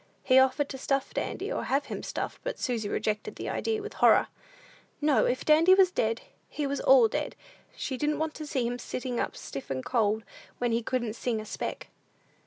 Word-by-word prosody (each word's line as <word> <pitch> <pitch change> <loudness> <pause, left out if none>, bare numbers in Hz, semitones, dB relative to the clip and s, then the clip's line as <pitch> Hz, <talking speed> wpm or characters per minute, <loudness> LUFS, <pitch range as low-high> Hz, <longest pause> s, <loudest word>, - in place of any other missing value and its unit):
He 255 0 +6
offered 265 +2 +3
to 265 - -6
stuff 275 0 -1
Dandy, - - -3
or - - -2
have 280 +2 +1
him - - -5
stuffed; - - -4
but - - -3
Susy 230 -5 -2
rejected 215 0 -2
the - - -5
idea 440 -2 -1
with 430 - -7
horror. - - +5 0.7
"No, 295 -2 +3
if 255 - -1
Dandy 325 +5 +6
was 380 -2 +5
dead, 225 -7 0 0.3
he 295 - -3
was 280 0 -2
all 260 -4 +7
dead; - - -3 0.4
she 260 - -3
didn't 300 +2 0
want 315 0 -2
to 305 - -7
see 265 -5 -1
him 245 +1 -2
sitting 250 0 -4
up - - -2
stiff 135 - -7
and 130 -1 -3
cold, 220 -3 +1 0.3
when 245 -1 0
he 230 +1 +1
couldn't 240 -2 -2
sing 230 -1 -2
a 215 - -6
speck." - - -5
255 Hz, 200 wpm, -28 LUFS, 230-295 Hz, 0.7 s, all